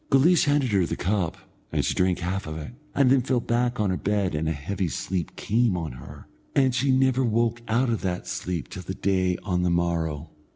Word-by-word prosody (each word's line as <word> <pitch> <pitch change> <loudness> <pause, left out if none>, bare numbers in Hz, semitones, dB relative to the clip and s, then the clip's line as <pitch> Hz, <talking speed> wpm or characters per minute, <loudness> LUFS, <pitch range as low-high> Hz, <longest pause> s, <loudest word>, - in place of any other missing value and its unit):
Guleesh 155 +6 +5
handed 145 -4 +2
her 95 -4 +2
the - - -2
cup, 95 -3 -1 0.3
and - - 0
she - - +1
drank 90 -1 +2
half 90 +1 -3
of 80 0 -5
it, 80 +8 -7 0.2
and 135 -3 +4
then 135 -1 +5
fell 125 0 +1
back 120 +1 0
on 105 -3 +2
her 90 - 0
bed 100 -3 0
and 80 +1 -1
a - - 0
heavy 85 +6 -2
sleep 90 +1 -3
came 115 -3 +1
on 80 -3 -3
her, - - -11 0.3
and 130 -2 +4
she 130 +2 +1
never 130 0 +3
woke 115 0 +1
out 120 +2 +2
of 115 - -1
that 90 -2 -2
sleep 85 -5 -3
till 90 - -8
the 95 +1 -6
day 95 -2 +1
on 90 -3 0
the 90 - +1
morrow. 85 -3 -1
95 Hz, 220 wpm, -25 LUFS, 85-120 Hz, 0.3 s, Guleesh